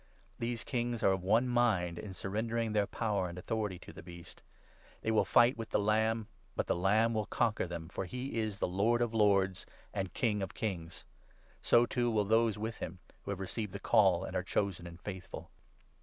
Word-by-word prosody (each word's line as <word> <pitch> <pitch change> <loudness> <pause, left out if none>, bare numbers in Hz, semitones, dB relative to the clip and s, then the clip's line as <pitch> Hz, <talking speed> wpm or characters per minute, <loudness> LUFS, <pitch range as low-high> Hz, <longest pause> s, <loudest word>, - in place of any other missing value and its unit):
These 120 0 -2
kings 120 -2 -2
are 95 - +5
of 95 -1 0
one 110 +7 +3
mind 105 -9 +2
in 100 -3 -7
surrendering 110 +5 -1
13 - - -3
their 105 -2 +2
power 100 -5 -1
and 85 - -8
authority 105 0 -2
to - - -12
the - - -10
Beast. 85 0 -12 0.6
They 110 - +1
will 110 - +3
fight 120 +2 +5
with 115 -1 -5
14 - - -34
the 100 - -1
Lamb, 110 +1 +2 0.3
but - - 0
the - - +1
Lamb 105 +6 +3
will 110 -1 -1
conquer 105 -4 +1
them, 85 -1 -6
for 95 - -4
he 125 +5 -4
is 105 -2 -2
Lord 110 +6 +2
of 120 -1 -2
lords 100 -4 +2 0.3
and 95 -3 -2
King 105 -4 +1
of 95 - -4
kings; 85 -6 -4 0.6
so, 120 0 +5
too, 120 -1 0
will 105 -3 +2
those 110 0 +3
with 110 +2 -4
him 90 +2 -6 0.3
who - - -6
have 100 -2 -2
received 95 +1 -3
the 100 - -5
Call - - +4
and - - -6
are - - +1
chosen 95 -4 -1
and 85 0 -11
faithful. 95 -1 -7
105 Hz, 205 wpm, -33 LUFS, 95-115 Hz, 0.6 s, are